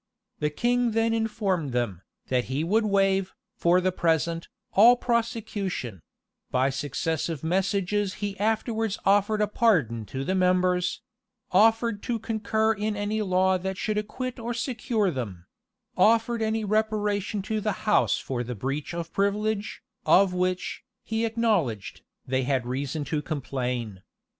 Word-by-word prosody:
The 150 Hz, -, +1 dB
king 240 Hz, +8 st, +1 dB
then 225 Hz, 0 st, +2 dB
informed 200 Hz, -, -1 dB
them, 115 Hz, -8 st, -1 dB, 0.3 s
that 125 Hz, -1 st, +1 dB
he 135 Hz, +5 st, -2 dB
would 215 Hz, +6 st, +2 dB
waive, 195 Hz, -1 st, +2 dB, 0.2 s
for 175 Hz, +1 st, +3 dB
the 185 Hz, +1 st, +1 dB
present, 165 Hz, -1 st, 0 dB, 0.3 s
all 230 Hz, +5 st, +8 dB
prosecution: 220 Hz, -, -2 dB, 0.5 s
by 130 Hz, +2 st, +2 dB
successive 155 Hz, +3 st, -2 dB
messages 195 Hz, +3 st, 0 dB
he 205 Hz, -1 st, -4 dB
afterwards 220 Hz, 0 st, 0 dB
offered 205 Hz, +2 st, +3 dB
a 210 Hz, -, +3 dB
pardon 160 Hz, -, +2 dB
to 135 Hz, +6 st, -4 dB
the 185 Hz, -, -1 dB
members; 180 Hz, -1 st, +1 dB, 0.5 s
offered 225 Hz, -1 st, +3 dB
to 240 Hz, -, -1 dB
concur 220 Hz, 0 st, 0 dB
in 210 Hz, 0 st, -2 dB
any 210 Hz, +1 st, -1 dB
law 185 Hz, -1 st, +2 dB
that 190 Hz, +1 st, -4 dB
should 210 Hz, +1 st, -1 dB
acquit 255 Hz, +4 st, -5 dB
or 235 Hz, +1 st, -3 dB
secure 230 Hz, -4 st, 0 dB
them; 100 Hz, -, -5 dB, 0.5 s
offered 230 Hz, +1 st, +3 dB
any 220 Hz, 0 st, 0 dB
reparation 210 Hz, -1 st, 0 dB
to 215 Hz, +1 st, -2 dB
the 215 Hz, 0 st, 0 dB
house 210 Hz, -, +3 dB
for 125 Hz, -2 st, -3 dB
the 125 Hz, +1 st, -5 dB
beach 135 Hz, -, -3 dB
of 170 Hz, -1 st, -5 dB
privilege, 205 Hz, +1 st, -1 dB, 0.2 s
of 190 Hz, -1 st, +5 dB
which, 180 Hz, 0 st, -1 dB, 0.2 s
he 225 Hz, +1 st, -1 dB
acknowledged, 210 Hz, -, 0 dB, 0.2 s
they 130 Hz, 0 st, 0 dB
had 130 Hz, -1 st, 0 dB
reason 140 Hz, +4 st, -3 dB
to 150 Hz, +1 st, -2 dB
complain. 125 Hz, -8 st, -3 dB
195 Hz, 140 wpm, -26 LUFS, 150-220 Hz, 0.5 s, all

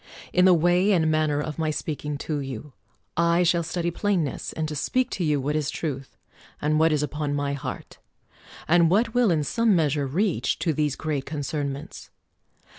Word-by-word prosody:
In 180 Hz, +1 st, +5 dB
the 185 Hz, -, +7 dB
way 175 Hz, +4 st, +3 dB
and 160 Hz, -3 st, +2 dB
manner 155 Hz, -2 st, +1 dB
of 150 Hz, +1 st, -4 dB
my 160 Hz, -1 st, 0 dB
speaking 150 Hz, -1 st, -3 dB
to 150 Hz, -2 st, -1 dB
you, 135 Hz, 0 st, -7 dB, 0.4 s
I 170 Hz, +1 st, +3 dB
shall 170 Hz, 0 st, +3 dB
study 170 Hz, +1 st, -2 dB
plainness, 175 Hz, -6 st, -1 dB
and 160 Hz, -1 st, -3 dB
to 150 Hz, -, -5 dB
speak 255 Hz, -, 0 dB
to 185 Hz, -, -2 dB
you 150 Hz, -3 st, +1 dB
what 145 Hz, +3 st, -1 dB
is 150 Hz, -2 st, 0 dB
truth, 140 Hz, -5 st, -5 dB, 0.4 s
and 155 Hz, +1 st, +1 dB
what 160 Hz, +1 st, +4 dB
is 150 Hz, -1 st, +1 dB
upon 150 Hz, 0 st, -2 dB
my 145 Hz, 0 st, -1 dB
heart, 140 Hz, -, -7 dB, 0.7 s
and 170 Hz, 0 st, +5 dB
what 220 Hz, +5 st, +2 dB
will 245 Hz, -3 st, +3 dB
in 160 Hz, -4 st, +2 dB
some 225 Hz, +7 st, +2 dB
measure 150 Hz, -4 st, +1 dB
reach 180 Hz, +6 st, 0 dB
to 165 Hz, -, 0 dB
these 150 Hz, -2 st, 0 dB
great 145 Hz, -4 st, -3 dB
concernments. 145 Hz, -1 st, -4 dB
155 Hz, 185 wpm, -25 LUFS, 145-175 Hz, 0.7 s, the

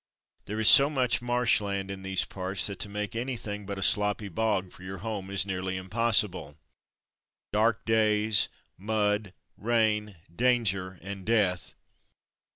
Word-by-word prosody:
There 105 Hz, +2 st, -5 dB
is 110 Hz, -, +3 dB
so 140 Hz, +1 st, +9 dB
much 130 Hz, -6 st, 0 dB
marsh 120 Hz, -2 st, +2 dB
land 100 Hz, -1 st, -3 dB
in 95 Hz, -1 st, -7 dB
these 95 Hz, 0 st, 0 dB
parts, 95 Hz, -1 st, -2 dB
that 100 Hz, -2 st, -2 dB
to 105 Hz, -, -3 dB
make 105 Hz, +1 st, -5 dB
anything 115 Hz, -5 st, -5 dB
but 100 Hz, -1 st, -5 dB
a 95 Hz, -, -2 dB
sloppy 105 Hz, +1 st, +2 dB
bog 100 Hz, -1 st, -1 dB
for -, -, -15 dB
your 95 Hz, +1 st, -7 dB
home 100 Hz, -4 st, -4 dB
is 100 Hz, -1 st, +2 dB
nearly 95 Hz, -1 st, -3 dB
impos 105 Hz, +3 st, +2 dB
sible. 80 Hz, -6 st, -10 dB, 1.0 s
Dark 110 Hz, 0 st, +1 dB
days, 110 Hz, -1 st, +2 dB, 0.3 s
mud, 105 Hz, -1 st, -1 dB, 0.3 s
rain, 105 Hz, -2 st, 0 dB, 0.2 s
danger, 100 Hz, -7 st, +1 dB
and 100 Hz, 0 st, -7 dB
death. 100 Hz, -5 st, 0 dB
105 Hz, 150 wpm, -28 LUFS, 95-110 Hz, 1.0 s, so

